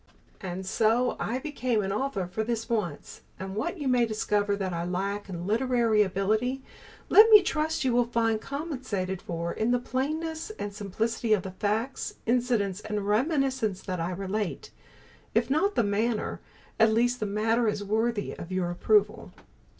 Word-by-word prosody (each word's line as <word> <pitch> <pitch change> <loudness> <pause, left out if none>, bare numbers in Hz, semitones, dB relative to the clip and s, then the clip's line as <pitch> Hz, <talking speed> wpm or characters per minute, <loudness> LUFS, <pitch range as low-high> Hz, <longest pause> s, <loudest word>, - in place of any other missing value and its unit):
And 185 0 -5
so 230 +5 +2
I 240 - -1
became 255 -6 -1
an 195 - -2
author 210 -3 -1
for 195 +5 -3
this 225 0 -2
once, 215 -7 -3 0.2
and 190 +1 -5
what 340 - -2
you 290 -4 -3
may 245 -2 +3
discover 205 -2 0
that 190 -2 -3
I 170 0 -2
lack 195 +3 -3
in 175 -2 -5
literary 230 0 +2
ability, 215 +7 0 0.5
let 435 +2 +8
me 425 -3 +9
trust 315 -2 -1
you 255 - +2
will 240 0 +3
find 225 -2 +1
compensated 255 - -4
for 170 0 -4
in 220 - 0
the 245 - +3
plainness 315 - -3
and 205 - -4
simplicity 220 +3 -1
of 200 -4 +1
the 190 - -6
facts, 215 +7 -2
incidents 230 -5 +1
and 210 -2 -3
reminiscences 255 - +1
that 185 -2 -3
I 165 +1 -1
relate. 195 +2 -3 0.6
If 235 +3 +2
not 390 +8 +2
the - - +3
manner, 215 +2 -1 0.4
at 225 0 +6
least 240 +2 +2
the 215 - -1
matter 225 +3 +1
is 205 -1 -1
worthy 220 +1 -1
of 170 - -9
your 185 -2 -1
approval. 415 - +1
220 Hz, 165 wpm, -28 LUFS, 200-250 Hz, 0.6 s, me